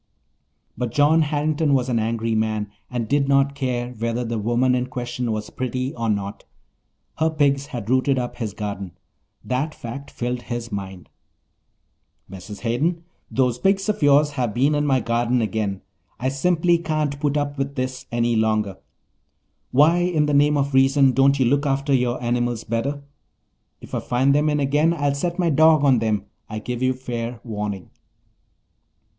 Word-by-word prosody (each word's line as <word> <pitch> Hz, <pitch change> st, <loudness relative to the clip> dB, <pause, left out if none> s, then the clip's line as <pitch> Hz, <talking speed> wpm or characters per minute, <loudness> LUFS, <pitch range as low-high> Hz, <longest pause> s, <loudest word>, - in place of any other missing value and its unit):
But 125 Hz, 0 st, -2 dB
John 150 Hz, +5 st, +4 dB
Harrington 150 Hz, 0 st, +1 dB
was 130 Hz, -1 st, +1 dB
an 120 Hz, -3 st, +1 dB
angry 115 Hz, 0 st, -1 dB
man 110 Hz, -2 st, -1 dB, 0.2 s
and 120 Hz, -3 st, -3 dB
did 140 Hz, +1 st, +1 dB
not 140 Hz, 0 st, +3 dB
care 125 Hz, -3 st, -2 dB
whether 115 Hz, +1 st, -2 dB
the 115 Hz, -1 st, -2 dB
woman 120 Hz, +4 st, +2 dB
in 125 Hz, 0 st, 0 dB
question 125 Hz, -1 st, -3 dB
was 110 Hz, -1 st, -4 dB
pretty 130 Hz, +1 st, -3 dB
or 115 Hz, -1 st, -2 dB
not. 100 Hz, -1 st, -2 dB, 0.8 s
Her 160 Hz, +1 st, +3 dB
pigs 140 Hz, -3 st, +1 dB
had 115 Hz, -5 st, -6 dB
rooted 130 Hz, +2 st, +2 dB
up 120 Hz, -1 st, -3 dB
his 110 Hz, -4 st, -4 dB
garden—that 105 Hz, -, -6 dB
fact 140 Hz, +4 st, -7 dB
filled 125 Hz, 0 st, -3 dB
his 120 Hz, -1 st, -5 dB
mind. 95 Hz, -3 st, -6 dB, 1.2 s
"Mrs. 95 Hz, +2 st, -9 dB
Hayden, 155 Hz, +9 st, 0 dB, 0.3 s
those 125 Hz, -2 st, +1 dB
pigs 195 Hz, +1 st, +1 dB
of 210 Hz, -, -1 dB
yours 145 Hz, +1 st, +5 dB
have 125 Hz, -6 st, -2 dB
been 135 Hz, +5 st, +3 dB
in 145 Hz, 0 st, +1 dB
my 130 Hz, -2 st, +2 dB
garden 120 Hz, +2 st, +1 dB
again. 105 Hz, -3 st, -2 dB, 0.4 s
I 130 Hz, +2 st, 0 dB
simply 170 Hz, +4 st, +2 dB
can't 155 Hz, -3 st, -2 dB
put 145 Hz, 0 st, 0 dB
up 145 Hz, -1 st, -2 dB
with 140 Hz, +1 st, -2 dB
this 130 Hz, 0 st, -4 dB
any 120 Hz, 0 st, +1 dB
longer. 110 Hz, -3 st, +1 dB, 0.9 s
Why 150 Hz, +6 st, +5 dB
in 175 Hz, -4 st, +1 dB
the 150 Hz, -, 0 dB
name 145 Hz, +1 st, +4 dB
of 140 Hz, 0 st, -1 dB
reason 135 Hz, +1 st, +5 dB
don't 135 Hz, +2 st, +4 dB
you 130 Hz, -, +3 dB
look 140 Hz, +4 st, +2 dB
after 140 Hz, +1 st, 0 dB
your 125 Hz, -2 st, +1 dB
animals 120 Hz, -1 st, -1 dB
better? 135 Hz, +6 st, -2 dB, 0.8 s
If -, -, -13 dB
I -, -, 0 dB
find 130 Hz, +3 st, +1 dB
them 150 Hz, +2 st, +2 dB
in 150 Hz, 0 st, +1 dB
again 145 Hz, +4 st, +2 dB
I'll 145 Hz, -3 st, 0 dB
set 170 Hz, +5 st, -2 dB
my 175 Hz, -3 st, +1 dB
dog 155 Hz, 0 st, +5 dB
on 135 Hz, -4 st, +4 dB
them, 105 Hz, -3 st, -1 dB, 0.2 s
I 110 Hz, -, -5 dB
give 120 Hz, +3 st, -4 dB
you 130 Hz, 0 st, +2 dB
fair 120 Hz, -2 st, -5 dB
warning." 105 Hz, -5 st, -5 dB
130 Hz, 170 wpm, -22 LUFS, 115-145 Hz, 1.2 s, yours